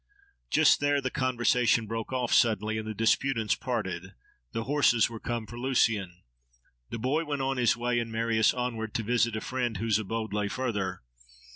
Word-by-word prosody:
Just 155 -2 +5
there 145 0 +2
the 130 -2 -3
conversation 125 -3 +2
broke 115 +2 -5
off 125 -2 -1
suddenly, 110 -1 +2
and 110 - -6
the 110 - -3
disputants 115 0 +1
parted. 95 -7 -4 0.4
The 115 - -3
horses 120 -5 +3
were 115 - -7
come 120 -1 -3
for 120 +2 -9
Lucian. 105 -8 0 0.7
The - - -4
boy 135 +8 0
went 145 -3 -3
on 135 0 -1
his 120 -2 +3
way, 120 0 0
and 115 -1 -4
Marius 115 -1 +2
onward, 115 -3 -4
to 115 - 0
visit 115 0 +1
a 110 - -3
friend 125 -4 -2
whose 110 +1 +1
abode 110 +1 -4
lay 105 -1 0
further. 105 - -3
115 Hz, 175 wpm, -28 LUFS, 110-125 Hz, 0.7 s, Just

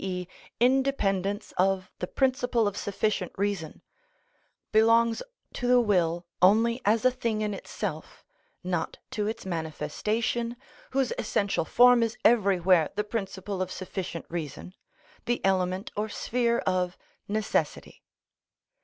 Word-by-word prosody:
e._, 180 -2 -3 0.3
independence 215 -6 +1
of 190 0 +1
the 180 - -3
principle 250 -3 +1
of 205 - -2
sufficient 205 -2 -1
reason, 195 -5 -3 0.9
belongs 230 +1 +4 0.3
to 245 - -3
the 250 0 +6
will 175 -6 +1 0.2
only 225 +6 +4
as 220 +3 +2
a 255 - +6
thing 230 -4 -2
in 210 -1 -1
itself, 185 -4 -6 0.4
not 175 -2 -2
to 210 -1 -1
its 220 - -4
manifestation, 210 +9 -2 0.3
whose 265 -2 0
essential 200 -5 0
form 245 +3 +6
is 230 0 -1
everywhere 190 -7 +4
the 210 - 0
principle 195 -3 -4
of 185 0 -2
sufficient 185 -3 -5
reason, 170 +1 -6 0.5
the 240 +1 0
element 185 +1 0
or 215 +1 -2
sphere 235 +2 0
of 180 -1 0 0.3
necessity. 215 +1 -2
205 Hz, 120 wpm, -27 LUFS, 185-230 Hz, 0.9 s, the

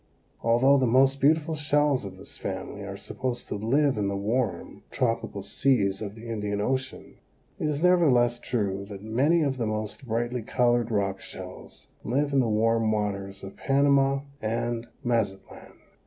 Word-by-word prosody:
Although 130 +5 +4
the 130 - +2
most 135 +3 +4
beautiful 155 +3 +3
shells 145 -4 +1
of 95 -1 -8
this 95 - -10
family - - -5
are - - -6
supposed 125 -1 -4
to - - -2
live 130 +4 +1
in 100 - 0
the 100 0 -1
warm, 110 +2 -2
tropical 115 -5 -1
seas 100 -3 +1
of 105 -1 -5
the 115 +1 -10
Indian 105 -2 -2
Ocean, 130 +4 -3 0.4
it 155 - 0
is 150 +1 -1
nevertheless 130 -10 +4
true 100 -6 -2
that 100 -1 -9
many 140 +10 +2
of 135 -2 -1
the 115 -3 -1
most 110 +4 -4
brightly 120 +2 -1
colored 120 0 +1
rock 100 -3 -1
shells - - -10 0.2
live 140 +5 0
in 135 - +4
the 125 - +2
warm 110 +1 +2
waters 100 -2 -3
of 95 - -8
Panama 140 0 +3 0.2
and 115 +1 -2 0.2
Mazatlan. 110 -6 -2
120 Hz, 160 wpm, -27 LUFS, 105-135 Hz, 0.4 s, Although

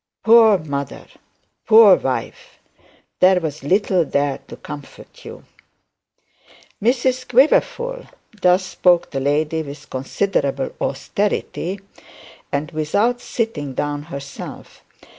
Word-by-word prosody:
Poor 225 -2 +6
mother! 140 -5 -5 0.6
Poor 220 -3 +8
wife! 130 -6 -5 0.6
There 185 0 +5
was 155 -3 -5
little 185 +2 +2
there 140 -2 -1
to - - -9
comfort 145 -2 -11
you! - - -10 1.4
'Mrs 255 +2 +1
Quiverful,' 480 - +2 0.3
thus 180 +1 +3
spoke 180 -1 +2
the 135 - -2
lady 150 +3 0
with 145 -1 -10
considerable 135 0 -1
austerity, 195 +4 -2 0.7
and 150 +3 -2
without 205 +11 0
sitting 150 - -3
down 145 +1 -2
herself. 140 -2 -9
170 Hz, 100 wpm, -20 LUFS, 145-220 Hz, 1.4 s, Poor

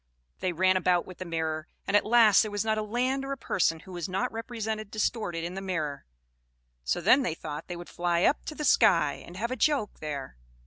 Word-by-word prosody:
They 185 - 0
ran 185 +2 +3
about 180 -1 +2
with 185 - -11
the 185 - -5
mirror; 160 -1 -2 0.2
and 195 - 0
at 205 - +4
last 225 -3 +6
there 215 - -1
was 205 +1 -2
not 220 -1 +1
a - - 0
land 250 +5 -1
or 275 0 -3
a - - -6
person 165 -8 0
who 185 - -13
was 175 -1 -4
not 190 +1 -1
represented 220 -2 -4
distorted 210 -5 -2
in 175 +1 -4
the 195 - -5
mirror. 155 -7 -3 0.8
So - - -1
then 275 - +5
they 170 -11 -1
thought 150 -1 -7
they 175 - -5
would 175 - -9
fly 175 0 0
up 290 - +2
to 305 - -5
the 300 - -3
sky, - - +4
and 175 - -11
have 235 +5 -2
a - - -1
joke 275 -7 0
there. 140 - -5
190 Hz, 230 wpm, -28 LUFS, 170-225 Hz, 0.8 s, last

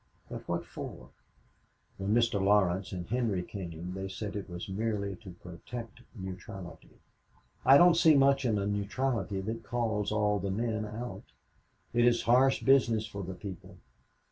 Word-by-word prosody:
But - - -7
what - - -2
for? - - -8 0.9
When 100 +1 -1
Mr. 115 -4 +2
Laurence 95 -2 +3
and 90 -2 -4
Henry 110 -6 0
came 90 -2 -6
they 95 0 -4
said 100 +2 -5
it 100 -2 -5
was 90 +4 -6
merely 100 -1 -2
to 95 -6 -11
protect 115 +7 -8
neutrality. 95 -2 -9 0.7
I 135 +2 +8
don't 175 +2 +7
see 165 -2 +6
much 135 0 +4
in 115 -4 +1
a 100 - -1
neutrality 105 +1 -1
that 110 +3 -4
calls 110 -3 -1
all 105 -1 +2
the 100 +1 -3
men 110 +1 -1
out. 115 +3 -6 0.7
It 120 0 +4
is 120 -1 +3
harsh 130 +3 +4
business 120 -5 +4
for 100 -1 -7
the 95 0 -6
people. 95 -2 -9
105 Hz, 155 wpm, -30 LUFS, 95-120 Hz, 0.9 s, I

